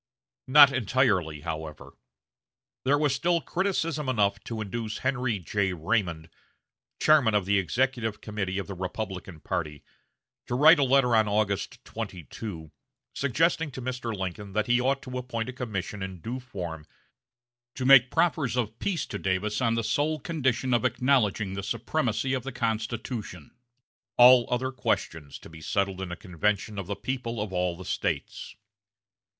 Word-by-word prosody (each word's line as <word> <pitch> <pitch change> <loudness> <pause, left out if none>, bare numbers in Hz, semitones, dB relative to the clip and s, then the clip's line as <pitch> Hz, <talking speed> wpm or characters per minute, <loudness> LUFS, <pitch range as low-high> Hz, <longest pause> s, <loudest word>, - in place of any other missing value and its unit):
Not 140 +1 +8
entirely, 100 - +1
however. 80 -2 -6 0.9
There 140 +2 +4
was 145 -2 +2
still 170 +5 +1
criticism 165 -6 -1
enough 100 -4 +1
to 115 -2 -5
induce 110 +1 -4
Henry 125 -4 0
J. 95 +1 -1
Raymond, 85 -2 -1 0.7
chairman 140 -8 +4
of 100 -3 +2
the 100 +1 +3
executive 115 - -1
committee 100 -3 -3
of 100 - -2
the 100 - -6
Republican 95 -2 -5
party, 75 -1 -4 0.6
to 120 - -2
write 155 +5 +7
a - - +4
letter 130 -2 +4
on 110 -1 +4
August 105 +4 -1
22, 90 - -7 0.4
suggesting 160 +4 +1
to 130 - -8
Mr. 125 -2 -4
Lincoln 95 0 -5
that 105 +1 +1
he 120 +1 +3
ought 135 +2 0
to 125 -1 -5
appoint 120 -1 -4
a - - -5
commission 105 -5 -4
in 95 -2 -5
due 120 +9 -5
form 85 -11 -7 0.9
to 130 - -3
make 130 -2 +8
proffers 155 -6 +1
of 115 -2 -2
peace 185 -5 -1
to 100 - -6
Davis 100 +4 -1
on 115 -2 +2
the 115 - 0
sole 145 +8 0
condition 130 -6 0
of 120 - +2
acknowledging 120 -5 +1
the 100 - -3
supremacy 120 +4 -1
of 130 - 0
the 135 +3 -6
Constitution; 110 - -4 0.7
all 125 0 +8
other 130 +1 -1
questions 80 - -2
to - - -13
be 80 -1 -12
settled 95 +2 -1
in 95 -2 -5
a - - -3
convention 100 +3 -2
of 95 - -6
the 100 - -3
people 120 -2 -4
of 105 -2 -4
all 90 -1 0
the 95 - -9
States. - - -3
115 Hz, 155 wpm, -27 LUFS, 95-130 Hz, 0.9 s, Not